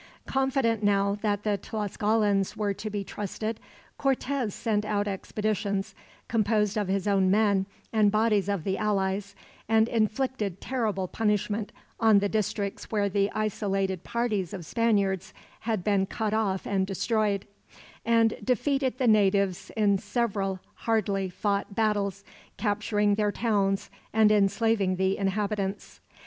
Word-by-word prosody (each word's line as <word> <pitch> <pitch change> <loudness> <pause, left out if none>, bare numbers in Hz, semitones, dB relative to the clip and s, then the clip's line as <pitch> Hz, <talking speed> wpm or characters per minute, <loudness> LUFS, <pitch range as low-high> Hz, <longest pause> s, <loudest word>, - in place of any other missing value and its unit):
Confident 265 -4 +1
now 200 -1 +2
that 205 -1 0
the 205 -2 0
Tlascalans 210 -1 0
were 205 -2 0
to 215 +2 -6
be 205 -1 -3
trusted, 215 +3 -4 0.4
Cortez 270 -3 0
sent 210 0 -1
out 210 -1 -1
expeditions, 200 0 -2 0.3
composed 210 -2 +1
of 210 -3 0
his 195 +1 -1
own 195 -2 +3
men 200 -1 +3 0.3
and 215 -2 +4
bodies 215 -2 +2
of 200 -5 -1
the 190 +2 -1
allies, 200 -1 -1 0.3
and 220 0 +4
inflicted 220 -3 -1
terrible 215 -8 -1
punishment 210 0 -1 0.3
on 220 -2 +6
the 200 0 +2
districts 200 -1 -2
where 205 -2 +1
the 200 +1 +1
isolated 195 -3 -1
parties 215 -6 -1
of 175 -4 -7
Spaniards 200 -4 0 0.2
had 220 -5 -2
been 195 -1 +2
cut 215 +1 -2
off 200 -4 0
and 190 -1 0
destroyed; 205 0 0 0.6
and 230 -1 +3
defeated 260 +1 0
the 255 - +1
natives 200 -3 +3
in 200 -2 +3
several 195 -6 -1
hardly 200 -4 0
fought 200 +2 -2
battles, 205 -3 0 0.3
capturing 210 -1 +1
their 210 0 +1
towns 200 -4 0 0.2
and 215 -1 +5
enslaving 205 -1 +2
the 190 +1 +1
inhabitants. 200 0 -2
205 Hz, 130 wpm, -27 LUFS, 195-220 Hz, 0.6 s, on